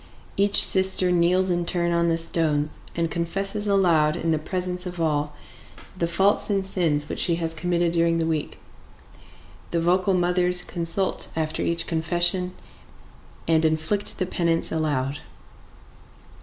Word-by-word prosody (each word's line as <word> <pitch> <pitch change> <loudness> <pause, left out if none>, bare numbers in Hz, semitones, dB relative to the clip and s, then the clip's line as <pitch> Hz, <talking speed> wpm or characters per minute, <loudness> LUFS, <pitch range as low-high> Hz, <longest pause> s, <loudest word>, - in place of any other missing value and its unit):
Each 200 +1 +6
sister 190 -1 +2
kneels 180 +2 +2
in 175 0 0
turn 170 0 -1
on 170 0 +1
the 165 - +1
stones, 155 -3 -1 0.2
and 165 -1 -2
confesses 195 +5 -2
aloud, 170 -6 +2
in 165 - -2
the 155 - 0
presence 180 +2 -3
of 175 -1 -7
all, 150 -2 -1 0.6
the 170 -2 -1
faults 195 +6 +1
and 195 -2 0
sins 160 -6 +1
which - - -4
she 170 - +3
has 165 -1 -2
committed 170 +1 -1
during 165 0 +1
the 165 - 0
week. 160 -2 -3 1.1
The 170 - -1
vocal 185 +3 +1
mothers 180 0 +1
consult 175 +2 -2
after 155 -1 -2
each 170 0 0
confession 175 +2 0 0.9
and 160 -1 +2
inflict 160 +6 +2
the 185 - -1
penance 170 -2 -1
aloud. 145 -3 -2
170 Hz, 140 wpm, -23 LUFS, 160-180 Hz, 1.1 s, Each